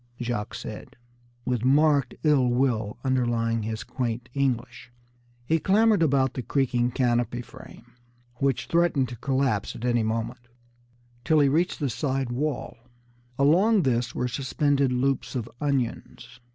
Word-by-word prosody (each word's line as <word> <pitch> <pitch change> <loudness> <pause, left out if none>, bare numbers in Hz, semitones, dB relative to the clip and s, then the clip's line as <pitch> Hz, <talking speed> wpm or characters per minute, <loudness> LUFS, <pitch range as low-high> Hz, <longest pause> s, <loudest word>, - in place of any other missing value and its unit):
Jacques 120 -4 -3
said, - - -8 0.5
with 125 -2 -1
marked 140 0 +3
ill 145 -5 +4
will 120 -4 0
underlying 120 -3 0
his 110 +1 -4
quaint 120 -1 -4
English. 125 -3 -2 0.5
He 160 +5 +2
clambered 210 +3 +3
about 135 -4 +2
the 130 - -4
creaking 125 -2 0
canopy 120 -1 0
frame, - - -14 0.5
which 135 -1 0
threatened 170 -6 +1
to 120 - -7
collapse 130 -4 -1
at 115 - -6
any 120 -1 +2
moment, 115 +2 -3 0.8
till 155 +1 +3
he 140 -2 +4
reached 170 +6 +1
the 145 - 0
side 135 -2 -2
wall. 140 -1 -3 0.6
Along 180 +9 +4
this 125 -2 0
were 125 - -1
suspended 140 +1 0
loops 135 +2 -1
of 120 -3 -3
onions. 125 -3 -3
130 Hz, 135 wpm, -26 LUFS, 120-140 Hz, 0.8 s, ill